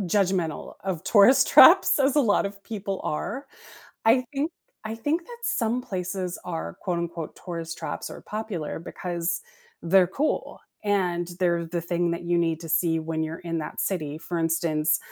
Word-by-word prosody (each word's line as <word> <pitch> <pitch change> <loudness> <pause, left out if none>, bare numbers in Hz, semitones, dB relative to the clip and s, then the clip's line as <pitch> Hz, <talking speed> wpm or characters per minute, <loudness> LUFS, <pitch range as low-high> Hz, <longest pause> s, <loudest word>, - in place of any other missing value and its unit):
judgmental 185 -4 0
of 185 -4 -3
tourist 215 +5 +6
traps - - +8
as 275 +1 +3
a 295 - +7
lot 210 -5 +3
of 200 0 -6
people 200 -3 -4
are. 220 - -3 0.6
I 250 +3 +5
think 290 +3 -1 0.3
I 220 0 -4
think 300 +9 -1
that 480 - -10
some 245 - 0
places 185 -3 -4
are 85 +1 -5
quote 180 -2 -1
unquote 170 -2 -5
"tourist 165 -2 -5
traps" - - -5
are - - -10
popular 210 -9 -4
because 175 - -3 0.4
they're 180 +2 +5
cool, 275 - -2 0.2
and 180 -4 0
they're 170 -2 +1
the 170 +1 -3
thing 170 0 0
that 170 - -4
you 175 0 +1
need 165 -2 +1
to 165 - -7
see 165 0 +2
when 160 0 -2
you're 160 +1 -4
in 165 -2 -3
that 150 - -4
city. 155 -6 -2
For 170 +2 -4
instance, 165 -2 +1
175 Hz, 170 wpm, -26 LUFS, 165-205 Hz, 0.6 s, traps